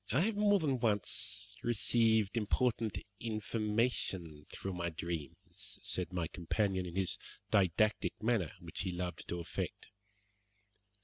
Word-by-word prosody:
"I 130 +8 +4
have 215 +3 +2
more 205 0 +5
than 140 -8 +1
once 105 -4 +1
received 115 -2 +3
important 115 0 +1 0.2
information 105 -7 -1
through 95 - -4
my 85 -1 -1
dreams," 80 -3 -5
said 90 0 -1
my 90 -2 0
companion 95 +2 0
in 85 - -7
the 95 -1 +1 0.4
didactic 100 0 +3
manner 110 -6 +1
which 85 -2 -6
he 95 - 0
loved 90 0 -4
to 85 - -2
affect. 85 - -4
100 Hz, 125 wpm, -35 LUFS, 90-115 Hz, 0.4 s, more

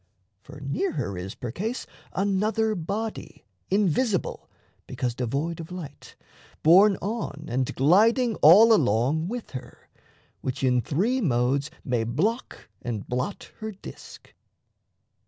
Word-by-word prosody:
For 135 - -12
near 145 +7 -2
her 120 -10 -3
is, 90 +2 -6
percase, 185 - -4 0.3
another 210 +3 +1
body, 210 - -5 0.2
Invisible, 200 - 0 0.4
because 125 -2 -2
devoid 140 +8 -2
of 165 +1 -8
light, 180 -5 -9 0.5
Borne 190 +5 +6
on 200 -8 -4
and 130 +1 -1
gliding 225 - +4
all 210 +9 +8
along 140 - +2
with 240 +3 -6
her, 130 -2 -10 0.5
Which 130 +2 -4
in 125 -1 +3
three 205 - 0
modes 135 - +1 0.2
may 120 -4 0
block 185 - -2
and 110 -4 -4
blot 125 +11 -4
her 220 0 -4
disk. 195 - -12
160 Hz, 120 wpm, -26 LUFS, 130-210 Hz, 0.5 s, all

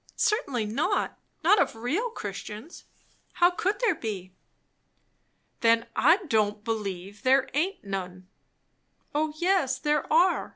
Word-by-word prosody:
Certainly 280 - 0
not. 210 +2 -1 0.2
Not 390 +5 +5
of - - 0
real 300 - -1
Christians. 210 - -8 0.5
How 350 +1 +4
could 380 +3 -1
there 460 -6 +3
be?" 200 - -6 1.3
"Then 230 0 +3
I 310 - +5
don't 210 -6 +1
believe 200 -3 -4
there 265 0 +3
aint 345 +8 -1
none." 185 -2 -5 0.9
"O 305 +1 0
yes, 345 -7 +2
there 295 +1 -1
are! 345 +4 +3
255 Hz, 120 wpm, -27 LUFS, 210-345 Hz, 1.3 s, Not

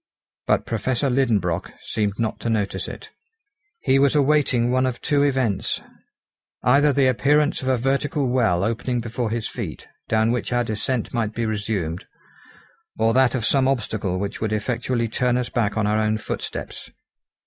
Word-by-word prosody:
But - - +2
Professor 130 +4 -1
Liedenbrock 110 -10 0
seemed 105 -2 -1
not 115 -2 -2
to 115 - -3
notice 105 -3 -1
it. - - -9 0.7
He 135 - +4
was 140 +1 +3
awaiting 140 -4 +3
one 130 +1 +2
of 125 -1 -3
two 145 -2 +1
events, 130 -8 +1 0.8
either 140 +4 +5
the 140 0 +3
appearance 145 +4 +2
of 130 - -4
a 130 -1 +3
vertical 135 +2 0
well 110 -8 +2
opening 120 +3 -1
before 120 0 -3
his 115 0 -2
feet, - - -6 0.2
down 110 +1 +3
which 125 0 -2
our 120 0 +2
descent 115 +2 -2
might 110 -3 -1
be 115 - -1
resumed, 100 -6 -2 0.9
or 115 0 +2
that 130 0 +4
of 120 -4 -1
some 135 0 +3
obstacle 110 -7 -1
which 100 +2 -3
should 110 -1 -1
effectually 120 +2 -1
turn 125 +2 +1
us 125 -1 -2
back 110 -3 0
on 110 - +2
our 105 +1 +2
own 110 0 +1
footsteps. - - -6
120 Hz, 165 wpm, -23 LUFS, 110-130 Hz, 0.9 s, either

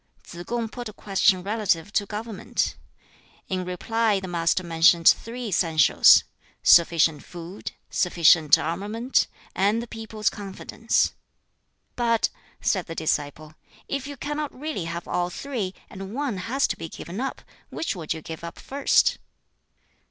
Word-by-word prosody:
Tsz 175 0 -9
kung 235 -1 -2
put 240 +1 -7
a - - -11
question 195 -2 +2
relative 205 -3 -1
to 205 - +1
government. 215 0 -3 0.7
In 185 -1 -1
reply 210 +4 0
the 190 - -7
Master 170 +1 0
mentioned 165 0 +4
three 240 +2 +3
essentials: 165 -4 +5 0.4
sufficient 165 -3 +5
food, 175 +2 -8 0.2
sufficient 165 -4 +5
armament, 210 +9 -1 0.3
and 205 +4 +2
the 235 - -4
people's 220 -2 -3
confidence. 205 +3 -1 0.8
"But," 230 -2 +2 0.3
said 190 -3 0
the 165 - -6
disciple, 155 -1 -2 0.3
"if 275 -1 -3
you 285 -1 -8
cannot 295 0 -4
really 295 - -3
have 170 0 -5
all 180 0 -1
three, 210 -3 -4
and 195 +3 -8
one 275 -7 -2
has 270 +3 +2
to - - -1
be 165 0 -7
given 185 +9 -7
up, 270 - -4 0.3
which 320 - -3
would 165 -4 -6
you 160 -1 -3
give 160 0 -8
up 170 - -7
first?" 280 +1 +2
195 Hz, 140 wpm, -25 LUFS, 170-230 Hz, 0.8 s, essentials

